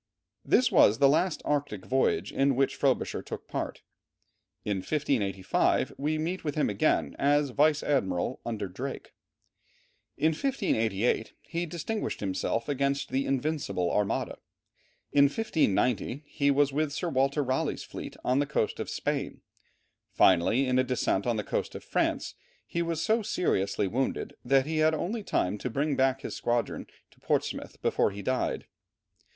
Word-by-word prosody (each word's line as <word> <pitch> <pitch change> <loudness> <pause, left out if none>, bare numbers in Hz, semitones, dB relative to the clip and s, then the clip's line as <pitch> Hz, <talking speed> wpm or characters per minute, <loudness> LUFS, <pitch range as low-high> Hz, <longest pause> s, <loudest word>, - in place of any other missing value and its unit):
This 255 - +3
was 105 - +6
the 140 - +6
last 155 +5 +1
Arctic 145 -9 -1
voyage 130 +1 +1
in 135 -1 +2
which 135 +1 +2
Frobisher - - 0
took - - -8
part. - - -4 0.8
In 105 -2 0
1585 100 -6 0
we 150 +3 -1
meet 170 +4 -3
with 150 -3 -2
him 155 - +1
again 155 - +1
as 145 0 +3
vice 150 +3 +3
admiral, 95 -5 0
under 110 -4 -3
Drake; 125 +9 -6 1.0
in 155 +3 +3
1588 115 - 0
he 170 +1 -3
distinguished 175 +7 -3
himself 100 +3 -2
against 140 -1 0
the 135 +1 -1
Invincible 135 - -1
Armada; 105 -1 -1 0.7
in 140 0 +6
1590 140 - 0
he 145 -1 0
was 140 0 +3
with 150 0 0
Sir 170 +4 -2
Walter 135 +1 +1
Raleigh's 130 0 -1
fleet - - -8
on 130 +2 +2
the 145 - +1
coast 140 -7 -1
of - - -4
Spain; - - -3 0.7
finally 95 +9 +4
in 130 0 +2
a - - +4
descent 125 -5 0
on 120 - +2
the 105 - -2
coast - - -3
of - - -7
France, - - -1 0.3
he 170 - -2
was 165 -1 -1
so 225 +1 +2
seriously 100 - 0
wounded 130 +7 -2
that 135 +1 +3
he 160 +1 -2
had 155 0 +4
only 215 +8 -2
time 100 - 0
to 125 - -3
bring 140 +6 0 0.3
his - - -5
squadron 120 0 -1
back - - -27 0.2
to - - -24
Portsmouth - - -2
before - - +2
he 100 0 -8
died. 130 +3 -1
135 Hz, 155 wpm, -28 LUFS, 115-155 Hz, 1.0 s, was